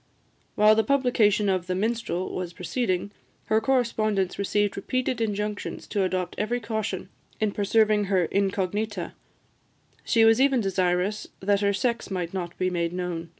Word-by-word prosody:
While 210 +1 +6
the 220 0 +3
publication 220 -5 +2
of 185 -2 0
the 180 - -1
"Minstrel" 205 -3 -2
was 180 -2 -4
proceeding, 185 +1 -2 0.3
her 220 +1 +2
correspondents 215 -6 0
received 205 0 +1
repeated 255 +3 -2
injunctions 210 -1 -3
to 205 - 0
adopt 185 -1 -1
every 235 +4 0
caution 220 -1 -3 0.3
in 215 -1 +1
preserving 210 +1 +2
her 190 -3 +2
incognita; 200 0 -1 0.9
she 225 -1 +4
was 225 +3 +5
even 270 -2 +4
desirous 190 0 0
that 200 +1 +1
her 200 0 +3
sex 235 +4 -1
might 180 -3 -3
not 175 -2 -4
be 185 0 0
made 170 -1 -1
known. 175 -2 -4
205 Hz, 150 wpm, -26 LUFS, 185-220 Hz, 0.9 s, While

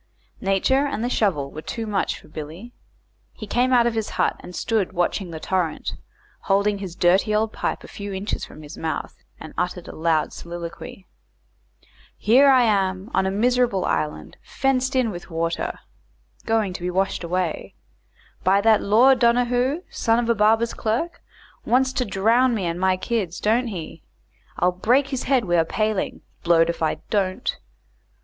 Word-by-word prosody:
Nature 230 +9 +2
and 235 -5 -3
the 245 - 0
shovel 150 - 0
were 155 - -7
too 225 +7 -5
much 210 -2 -1
for - - -18
Billy. 160 +10 -9 0.6
He 215 - -8
came 245 +5 +1
out 240 -2 +5
of 235 - +1
his 220 -2 -2
hut, - - +2
and 180 - -10
stood 215 -5 -1
watching 175 +1 -1
the 160 -1 -6
torrent, 180 -2 -2 0.5
holding 200 +1 +2
his 185 -4 -6
dirty 190 +5 +3
old 220 +1 0
pipe - - -3
a - - -10
few 200 0 -7
inches 195 +2 -3
from 155 - -10
his 150 +2 -10
mouth, 160 -1 -3 0.2
and 155 - -10
uttered 180 0 -3
a - - -9
loud 160 -1 +1
soliloquy: 170 +2 -8 1.1
"Here 265 +6 +5
I 260 -2 +6
am 195 -2 0
on 190 +1 +2
a - - +1
miserable 235 -1 +1
island 150 0 -2
fenced 260 0 0
in 250 -4 +2
with 175 -1 -9
water 165 0 -2 0.7
going 220 -4 +1
to 180 - -7
be 180 - -2
washed 190 +1 -1
away 175 -1 -2 0.7
by 195 +2 +4
that 220 +1 +4
Lord 245 +6 +5
Donahoo, 245 +6 +2
son 225 -1 +1
of 240 -1 0
a 235 - +4
barber's 225 +2 +2
clerk 290 +10 -2 0.4
wants 260 +2 +2
to 250 - 0
drown 230 +5 +2
me 195 -4 -2
and 170 +1 -2
my 185 0 +2
kids 185 -4 -2
don't 235 +4 +1
he 180 -8 -7 0.6
I'll 180 - +3
break 245 +10 +2
his 265 -3 -3
head 260 -4 +2
wi' 175 -1 +2
a - - +4
paling 215 +4 -2 0.2
blowed 170 -1 +4
if 170 - -11
I 160 - +1 0.2
don't." 200 +3 0
205 Hz, 170 wpm, -23 LUFS, 180-235 Hz, 1.1 s, I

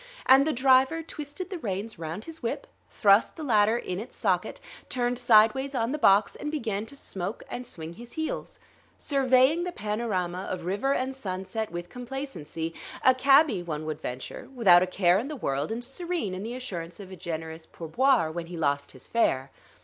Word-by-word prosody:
And 265 +3 +6
the - - +2
driver 265 +4 +4
twisted 305 +4 -7
the 365 - -4
reins 205 - -4
round 165 +6 -5
his 325 0 -9
whip, 230 - -3 0.2
thrust 200 0 +4
the 320 - -7
latter 220 -4 +3
in 185 -5 -4
its 225 - -8
socket, 185 -5 0 0.3
turned 245 -1 0
sidewise 245 +4 +4
on 230 0 0
the 300 - -2
box, 200 -4 +4
and 295 - -4
began 225 -8 -2
to 280 - -11
smoke 195 -5 -4
and 245 0 -5
swing 165 -6 -6
his 235 +6 -12
heels, 315 0 -4 0.4
surveying 270 +3 +3
the 360 - -3
panorama 205 - -2
of 175 -2 -4
river 235 +10 0
and 260 +1 -1
sunset 200 -2 -4
with 175 0 -6
complacency 240 - -5 0.3
a 260 - +8
cabby, 270 - +5
one 155 -3 -4
would 155 0 -4
venture, 130 - -6
without 185 -8 +7
a 185 - +1
care 185 0 +3
in 245 - -4
the 305 - -5
world 140 - -2
and 235 +2 -3
serene 325 - -3
in 185 - -5
the 230 +4 -5
assurance 175 -10 -6
of 190 -2 -10
a - - -7
generous 160 -1 -6
pour 165 - -9
boire 240 - +3
when 170 0 -5
he 175 0 -7
lost 140 -2 -1
his 130 - -13
fare. 135 - +1
220 Hz, 190 wpm, -27 LUFS, 175-265 Hz, 0.4 s, a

